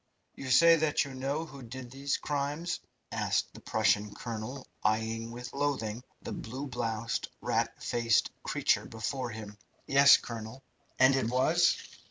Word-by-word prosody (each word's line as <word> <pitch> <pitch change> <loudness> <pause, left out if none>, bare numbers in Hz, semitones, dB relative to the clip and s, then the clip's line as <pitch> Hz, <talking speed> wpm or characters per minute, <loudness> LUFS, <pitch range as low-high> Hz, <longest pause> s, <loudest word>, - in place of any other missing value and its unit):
"You 135 - -7
say 165 +6 +7
that 155 -2 +2
you 140 - -8
know 140 +5 -2
who 140 -3 -11
did 125 +1 -8
these 140 +1 -1
crimes?" 150 +4 -2 0.3
asked - - 0
the - - -11
Prussian 105 0 +1
colonel, 120 +3 -5 0.2
eyeing 110 +1 0
with 120 +1 -8
loathing 130 -5 -1 0.2
the - - -5
blue 130 +6 -5
bloused, 115 -3 -2
rat - - -1
faced 115 -2 +2
creature - - +1
before 120 +3 -3
him. 105 -2 -8 0.3
"Yes, 140 0 +8
colonel." 115 +3 -7 0.3
"And 130 +1 +6
it 130 -4 +1
was 155 +8 +3
130 Hz, 145 wpm, -30 LUFS, 115-140 Hz, 0.3 s, Yes